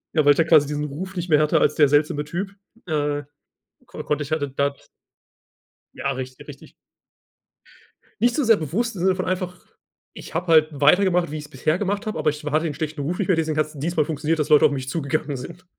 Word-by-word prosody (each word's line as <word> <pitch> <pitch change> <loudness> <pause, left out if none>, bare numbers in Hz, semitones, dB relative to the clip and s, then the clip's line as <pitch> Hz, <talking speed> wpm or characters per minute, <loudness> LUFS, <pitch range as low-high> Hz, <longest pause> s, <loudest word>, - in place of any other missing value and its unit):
Ja, 155 -2 +3
weil 145 - +7
ich - - -9
da 165 - +4
quasi 155 -3 +5
diesen 150 0 -3
Ruf 180 +7 -6
nicht 175 0 -4
mehr 150 -2 +5
hatte 150 - +3
als - - +2
der 150 -2 +5
seltsame 150 +1 +1
Typ, 185 +6 -4 0.3
äh, 145 -2 -1 0.6
ko - - -8
konnte 150 0 -1
ich 145 - -10
halt 155 -1 0
d 145 - -2
da 140 0 +1 1.2
Ja, 140 - -2
richtig, 130 0 -8
richtig. - - -12 1.5
Nicht 240 +1 +3
so 300 - +1
sehr 230 -2 +5
bewusst 200 - -2
in 175 - -5
dem - - +1
Sinne 190 - +3
von 185 - -3
einfach 180 -1 -3 0.6
ich - - -11
habe 175 +2 -2
halt 160 -2 +5
weitergemacht, 175 +4 +3
wie 155 - -4
ich's 150 -1 -8
bisher 155 +5 0
gemacht 205 +2 -2
habe, 215 -7 -3
aber 155 0 +2
ich 150 +1 -5
wa 150 - -3
hatte 155 +3 +1
den 155 - -2
schlechten 155 0 -5
Ruf 165 +6 -2
nicht 200 - -2
mehr, 180 - +3
deswegen 160 -1 -1
hat 155 - +2
es 150 -2 -12
dieses 170 +5 -2
mal 155 - +5
funktioniert, 155 +1 -1
dass 150 - -1
Leute 150 -1 +6
auf - - +4
mich 130 -2 -4
zugegangen 150 -1 -2
sind. 170 +8 -10
155 Hz, 240 wpm, -23 LUFS, 145-180 Hz, 1.5 s, weil